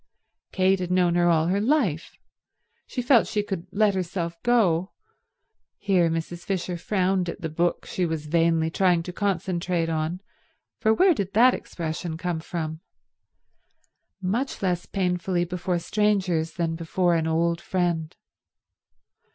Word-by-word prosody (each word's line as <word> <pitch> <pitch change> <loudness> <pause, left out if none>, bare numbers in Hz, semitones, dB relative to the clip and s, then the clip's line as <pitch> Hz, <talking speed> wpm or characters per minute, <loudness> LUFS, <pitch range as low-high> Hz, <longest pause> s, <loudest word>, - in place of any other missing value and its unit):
Kate 190 0 +2
had 180 -1 -3
known 180 -1 +3
her 175 0 +3
all 160 -1 +3
her 190 +4 +1
life. 220 - 0 0.7
She 250 - -4
felt 245 -2 +4
she 210 -2 -1
could 190 -3 -5
let 205 +1 +3
herself 175 -2 -3
go—here 190 -3 -1
Mrs. 165 +1 -4
Fisher 180 -2 -2
frowned 185 0 0
at 185 - -7
the 160 - -3
book 170 +3 -1
she 180 -2 -1
was 160 -2 -3
vainly 165 0 +2
trying 175 -2 +2
to 180 - -7
concentrate 180 -3 -1
on, 160 +2 -2 0.6
for 220 - +3
where 365 - +5
did 200 - -3
that 250 +4 +6
expression 160 0 -5
come 175 -1 -2
from?—much 160 -2 -5 1.8
less 180 -2 -1
painfully 180 -2 0
before 180 +1 -2
strangers 185 -4 0
than 165 -2 -1
before 175 +2 0
an 160 -1 +1
old 170 +1 +1
friend. 175 -3 -1
175 Hz, 135 wpm, -25 LUFS, 165-190 Hz, 1.8 s, that